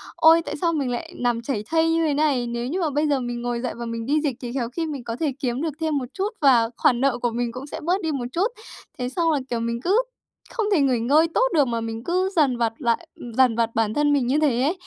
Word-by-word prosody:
ôi, 325 +1 +6
tại 295 - -5
sao 335 -1 +2
mình 280 -5 -1
lại 240 - -5
nằm 240 -1 0
chảy 235 -3 -3
thây 325 0 +3
như 330 0 +2
thế 290 - +1
này, 280 -5 +1
nếu 235 +1 -3
như 360 +6 -2
mà 315 - +1
bây 295 +2 0
giờ 285 -2 +2
mình 240 -1 -4
ngồi 240 0 -2
dậy 250 - -3
và 235 0 -6
mình 230 0 -4
đi 295 +4 +1
dịch 280 -6 -1
thì 245 -1 -5
khéo 240 -4 -2
khi 325 +6 -3
mình 285 -5 -5
có 230 -1 -4
thể 300 -4 0
kiếm 250 0 -2
được 320 -2 -2
thêm 315 -2 0
một 265 - -2
chút, 390 +2 -1
và 245 -5 +5
khoản 245 -1 +3
nợ 275 -2 +2
của 240 -1 -1
mình 240 0 -2
cũng 255 +4 -8
sẽ - - -6
bớt 360 +5 0
đi 320 -3 -1
một 270 -4 -3
chút. 365 +8 +1 0.5
Thế 250 0 -2
xong 330 +4 +1
là, 295 - +1
kiểu, 235 - -1
mình 235 0 -2
cứ 400 +7 +3 0.5
không 450 - -2
thể 345 -8 +4
nghỉ 255 -4 +2
ngơi 295 +8 +4
tốt - - +3
được, 295 -4 +4
mà 230 -1 -2
mình 225 0 -5
cứ 365 +5 0
dằn 275 -6 +3
vặt 230 -1 0
lại 235 -4 -1 0.3
dằn 255 -3 +5
vặt 230 0 0
bản 220 -1 +1
thân 295 +1 +2
mình 265 -4 +1
như 275 +4 +2
thế 270 -6 +2
ấy. 325 +7 +1
265 Hz, 285 wpm, -23 LUFS, 240-310 Hz, 0.5 s, ôi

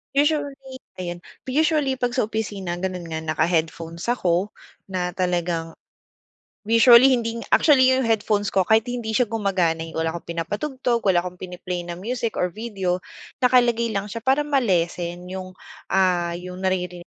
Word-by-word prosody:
Usually, 285 -3 0 0.2
ayan. 175 -1 -5 0.2
Usually 295 0 +2
'pag 245 -1 -1
sa 250 -4 0
opisina, 205 -5 -3
gano'n 180 -1 -4
nga 160 -1 -4
naka-headphones 165 +4 -1
ako 185 -3 0 0.4
na 180 -1 -2
talagang 175 -2 -1 0.9
usually 235 +4 +7
hindi 230 -2 0
nga - - -11
actually 260 -4 +5
yung 260 -1 +2
headphones 210 -2 0
ko 190 - +4
kahit 220 +4 +3
hindi 245 -2 -4
siya 250 - +3
gumagana 195 -7 0
eh 165 - -6
wala 160 0 0
akong 170 0 -8
pinapatugtog, 240 - -1
wala 190 -3 +3
akong 180 0 -8
pini-play 180 -1 -5
na 175 0 -7
music 230 +3 -3
or 180 -1 0
video, 190 -5 -2 0.4
nakalagay 240 -2 +3
lang 200 -1 -2
siya 225 +2 -6
para 270 +4 +2
ma-lessen 180 - 0
yung, 185 0 -6 0.4
ah, 175 -2 +1
yung 180 +1 -8
nariri 180 -2 -1
195 Hz, 150 wpm, -23 LUFS, 175-240 Hz, 0.9 s, usually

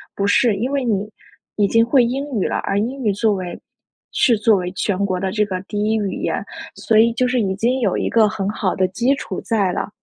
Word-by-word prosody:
不 200 - -1
是。 220 +1 +3
因 240 +7 -2
为 275 -3 -1
你 210 -2 -1 0.5
已 205 -1 +2
经 230 +3 +3
会 245 +1 +3
英 265 +4 -2 0.2
语 - - 0
了， - - -1
而 195 - -1
英 255 +5 -3
语 210 - +2
作 210 +1 +1
为 180 -2 -5 0.5
是 235 -4 +3
作 215 -1 +3
为 180 0 -3
全 200 0 -1
国 185 -2 -2
的 190 0 -2
这 210 -1 +1
个 185 -2 -4
第 205 +1 -3
一 220 +1 +1
语 200 -3 -2
言， - - -2 0.3
所 220 -1 +2
以 230 +1 +5
就 250 +2 +1
是 250 -1 +1
已 190 -2 -1
经 240 +6 0
有 205 -7 0
一 - - -1
个 220 -2 +4
很 195 -2 -3
好 205 -3 -1
的 185 0 +1
基 245 +8 +1
础 280 - -6
在 200 -5 0
了。 - - -3
215 Hz, 265 characters per minute, -20 LUFS, 195-235 Hz, 0.5 s, 以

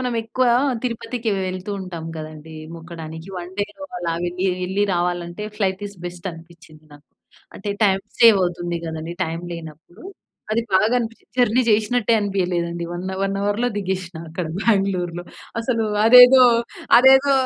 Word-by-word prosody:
మనం 250 -1 -2
ఎక్కువ 245 +3 0 0.4
తిరుపతికి 235 -1 -3 0.2
వెళ్తూ 185 +2 -5
ఉంటాం 175 -4 -7
గదండీ! 155 0 -9 0.2
మొక్కడానికి 165 0 -9
1 175 +1 -8
డేలో 210 +8 -4
అలాగా 170 -1 -2
వెళ్లి, 180 +2 -2 0.2
వెళ్ళి 190 +3 0
రావాలంటే 175 +2 -2
ఫ్లైట్ 195 -1 -1
ఈస్ 200 - -15
బెస్ట్ 175 +1 -6
అనిపిచ్చింది 165 -1 -16
నాకు. 145 0 -17 0.5
అంటే 200 - -7 0.2
టైమ్ 195 -1 +2 0.2
సేవ్ 230 -3 +8
అవుతుంది 175 -1 -3
గదండీ! 160 +1 -5
టైమ్ 165 +2 -5
లేనప్పుడు 160 0 -11 0.5
అది 230 +1 +1
బాగా 215 +5 +3
అనిపిచ్చింది. 230 -1 -7
జర్నీ 245 0 +4
చేషినట్టే 220 +2 +2
అనిపియలేదండి 175 -4 -1
వన్ 175 +1 -5
హవర్ 190 - -5
వన్ 195 0 -1
హవర్‌లో 205 +4 0
దిగేసిన 185 -3 -3
అక్కడ 165 +1 -4
బ్యాంగ్లూర్‌లో. 185 -5 0 0.4
అసలు 230 -1 0 0.2
అదేదో 250 +2 +9 0.6
అదేదో 265 +2 +6
185 Hz, 140 wpm, -21 LUFS, 170-220 Hz, 0.6 s, అదేదో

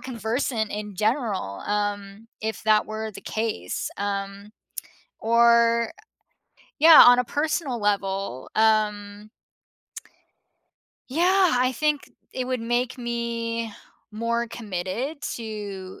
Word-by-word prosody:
conversant 230 -1 -2
in 210 -1 -5
general, 210 - -1
um, 205 +1 -3
if 220 -2 -4
that 215 -1 +4
were 220 0 -5
the 195 - -11
case, 215 - -3
um, 200 0 -4 0.7
or, 235 0 +4 0.9
yeah, 320 +1 +10
on 245 0 +7
a 250 - +2
personal 290 -2 -2
level, 195 -9 -2
um 210 -1 +1 1.8
yeah, 360 +6 +3
I 255 +1 +2
think 300 +3 -1 0.2
it 255 -1 -3
would 255 -1 -2
make 240 +2 -1
me 230 -1 -3 0.4
more 230 +2 -1
committed 225 - -5
to 205 -4 -7
220 Hz, 100 wpm, -24 LUFS, 205-245 Hz, 1.8 s, yeah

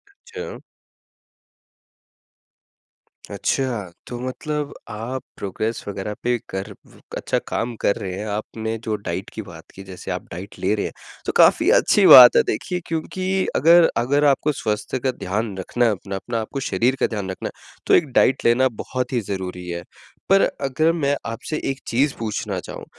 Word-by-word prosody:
अच्छा। 465 0 -8 2.7
अच्छा! 120 -9 -1 0.2
तो 120 -1 -6
मतलब 145 +3 -4 0.2
आप 115 +4 -5 0.2
प्रोग्रेस 110 +4 -3
वग़ैरह 100 +1 -4
पे 120 0 +2
कर 95 0 -5 0.2
व - - -19 0.2
अच्छा - - -1
काम 115 +1 -2
कर 100 - +2
रहे 100 -5 -5
हैं। 105 - -4
आपने 110 +1 -4
जो 110 -1 -1
डाइट 95 -2 -5
की 110 - -5
बात 85 -4 -11
की 95 - -9
जैसे 95 -2 -8
आप - - -3
डाइट 95 +5 -8
ले - - +1
रहे 105 - -2
हैं - - -5 0.3
तो - - 0
काफ़ी - - +5
अच्छी - - +3
बात - - +11
है। 460 - +6
देखिए 180 - -2
क्योंकि 185 +4 -1
अगर 170 +3 +6
अगर 140 +5 +2
आपको 145 +2 +3
स्वास्थ्य 105 +4 -2
का 130 +1 0
ध्यान 105 -1 -3
रखना 120 +6 0
है 115 - +4
अपना, 100 0 -5
अपना 115 +4 -3
आपको 135 +5 -5
शरीर 130 0 +1
का - - +3
ध्यान 100 -4 -4
रखना - - -5
है - - -24 0.3
तो - - +4
एक 155 - +5
डाइट 130 +2 +3
लेना 125 +3 +5 0.2
बहुत 130 +1 -3
ही 120 - +2
ज़रूरी 90 -2 -5
है। 85 0 -4 0.5
पर 195 0 +6 0.2
अगर 155 +4 +2
मैं 145 -4 +1
आपसे 115 +7 -4
एक 135 - -3
चीज़ 135 +4 +2
पूछना 110 -3 -3
चाहूँ - - -8
115 Hz, 170 wpm, -22 LUFS, 100-140 Hz, 2.7 s, बात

